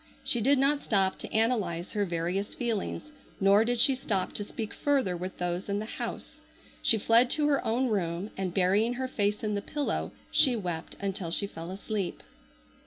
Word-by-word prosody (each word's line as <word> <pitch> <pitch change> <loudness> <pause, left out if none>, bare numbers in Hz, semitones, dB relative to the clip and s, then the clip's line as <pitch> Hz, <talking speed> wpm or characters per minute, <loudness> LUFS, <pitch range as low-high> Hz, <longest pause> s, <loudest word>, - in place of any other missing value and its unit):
She 240 - +3
did 275 +5 +4
not 280 +2 +2
stop 195 -3 +1
to - - -7
analyze 210 -7 0
her 205 -2 0
various 175 +3 -2
feelings, 240 +5 -3 0.3
nor 200 +1 +5
did 240 +1 0
she 270 - +7
stop 205 -7 -2
to 205 - -1
speak 215 +1 -6
further 270 -11 +1
with 185 +2 -6
those 180 +2 -3
in 200 - 0
the 210 - -3
house. - - -6 0.4
She 225 - +4
fled 230 +4 +4
to 300 +2 +3
her 280 -2 +2
own 245 +4 +1
room, 185 -2 -2
and 190 -2 -2
burying 195 +6 +3
her 260 +1 -2
face 210 -4 -1
in 210 -1 -1
the 200 - -1
pillow 290 +7 -2 0.2
she 260 -4 +4
wept 175 -6 -4
until 195 -3 -3
she 185 +4 +1
fell 165 -3 -8
asleep. 195 0 -4
205 Hz, 185 wpm, -29 LUFS, 185-240 Hz, 0.4 s, she